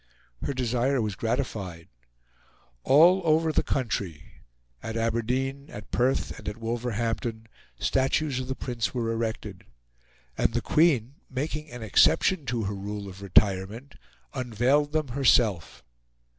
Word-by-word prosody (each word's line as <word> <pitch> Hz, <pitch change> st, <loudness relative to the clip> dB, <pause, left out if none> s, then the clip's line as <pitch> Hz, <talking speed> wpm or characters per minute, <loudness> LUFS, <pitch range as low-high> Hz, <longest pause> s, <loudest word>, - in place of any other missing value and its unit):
Her 140 Hz, -, -2 dB
desire 125 Hz, +2 st, +1 dB
was 110 Hz, -3 st, -1 dB
gratified; 100 Hz, -7 st, -3 dB, 1.0 s
all 170 Hz, +7 st, +6 dB
over 160 Hz, 0 st, +3 dB
the -, -, +2 dB
country 100 Hz, -, -3 dB, 0.4 s
at 115 Hz, 0 st, -4 dB
Aberdeen, 125 Hz, +5 st, -1 dB
at 105 Hz, -1 st, -10 dB
Perth, 130 Hz, +2 st, 0 dB
and -, -, -5 dB
at 105 Hz, -, -7 dB
Wolverhampton 115 Hz, 0 st, -3 dB, 0.3 s
statues 135 Hz, +1 st, +1 dB
of 130 Hz, -, -4 dB
the 130 Hz, -, -3 dB
Prince 120 Hz, -1 st, -3 dB
were 115 Hz, -2 st, -1 dB
erected; 110 Hz, -4 st, -4 dB, 0.7 s
and -, -, 0 dB
the -, -, +1 dB
Queen, 140 Hz, -5 st, +2 dB
making 150 Hz, +3 st, -4 dB
an 120 Hz, -1 st, -8 dB
exception 155 Hz, -, +3 dB
to 115 Hz, -1 st, -1 dB
her 100 Hz, +1 st, -2 dB
rule 100 Hz, +1 st, -5 dB
of 95 Hz, 0 st, -10 dB
retirement, 100 Hz, +6 st, +1 dB, 0.4 s
unveiled 130 Hz, +5 st, +1 dB
them 155 Hz, -3 st, -1 dB
herself. 120 Hz, -, +2 dB
120 Hz, 130 wpm, -27 LUFS, 110-135 Hz, 1.0 s, all